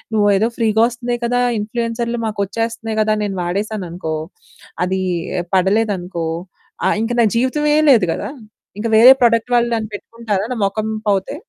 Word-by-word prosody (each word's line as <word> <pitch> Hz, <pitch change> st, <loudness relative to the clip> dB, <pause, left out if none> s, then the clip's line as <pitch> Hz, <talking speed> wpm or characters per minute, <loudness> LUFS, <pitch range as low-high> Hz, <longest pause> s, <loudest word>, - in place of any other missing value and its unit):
నువ్వేదో 205 Hz, +1 st, +3 dB
ఫ్రీగా 220 Hz, -1 st, +2 dB
వస్తున్నాయి 240 Hz, 0 st, -4 dB
కదా! 245 Hz, +1 st, +1 dB, 0.2 s
ఇన్‌ఫ్లుయెన్సర్లు 235 Hz, +2 st, -3 dB
మాకొచ్చేస్తున్నాయి 225 Hz, +2 st, -3 dB
కదా! 215 Hz, 0 st, +2 dB
నేను 200 Hz, -2 st, -3 dB
వాడేసాననుకో, 180 Hz, -3 st, -3 dB, 0.7 s
అది 190 Hz, +1 st, -1 dB, 0.5 s
పడలేదనుకో, 190 Hz, -3 st, 0 dB, 0.6 s
ఆహ్, -, -, +2 dB
ఇంక 225 Hz, -, -2 dB
నా -, -, +5 dB
జీవితమే 295 Hz, +5 st, +1 dB, 0.2 s
లేదు 225 Hz, -8 st, +5 dB
గదా! -, -, -5 dB, 0.5 s
ఇంక 225 Hz, -, -1 dB
వేరే 240 Hz, +4 st, +9 dB
ప్రొడక్ట్ 230 Hz, 0 st, +3 dB
వాళ్ళు 240 Hz, 0 st, +3 dB
నన్ను 220 Hz, -2 st, -3 dB
పెట్టుకుంటారా 210 Hz, -2 st, -3 dB
నా -, -, -5 dB
మొఖం 215 Hz, +2 st, -2 dB, 0.2 s
పోతే? 195 Hz, +6 st, 0 dB
220 Hz, 135 wpm, -18 LUFS, 200-235 Hz, 0.7 s, వేరే